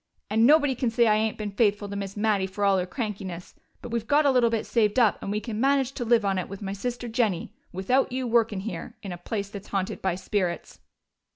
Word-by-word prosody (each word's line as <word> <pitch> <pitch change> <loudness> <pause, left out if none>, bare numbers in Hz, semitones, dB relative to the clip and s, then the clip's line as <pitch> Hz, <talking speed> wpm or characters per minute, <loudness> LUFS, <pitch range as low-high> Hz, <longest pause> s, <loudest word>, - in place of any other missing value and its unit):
"And 225 +2 +5
nobody 290 -2 +5
can 250 -1 -1
say 235 +1 +3
I 215 - +5
ain't 220 0 0
been 210 -1 -4
faithful 205 0 +1
to 200 - -6
Miss 200 0 -5
Mattie, 205 -3 +1
fer 200 +2 -4
all 195 -1 +4
her 180 - -2
crankiness. 195 -6 -5 0.3
But - - -6
we've 230 -1 -2
got 290 +2 +4
a 280 - +5
little 245 -3 +4
bit 225 -1 -1
saved 215 -1 +1
up, 230 -5 +3
and - - -5
we 210 - 0
can 215 0 -4
manage 270 -1 +2
to 275 - -4
live 230 -2 +3
on 195 -1 +1
it, 185 - -5
with 195 0 -7
my 195 -1 -4
sister 245 +4 -4
Jennie, 220 -6 -1 0.2
without 245 +10 +1
you 255 0 -2
workin' 225 -4 +2
here. 225 +3 -6
In 195 - -5
a 175 - -5
place 200 +2 -4
that's 200 0 -9
haunted 195 +2 -2
by 190 -2 0
spirits!" 185 -2 -3
215 Hz, 245 wpm, -26 LUFS, 195-235 Hz, 0.3 s, And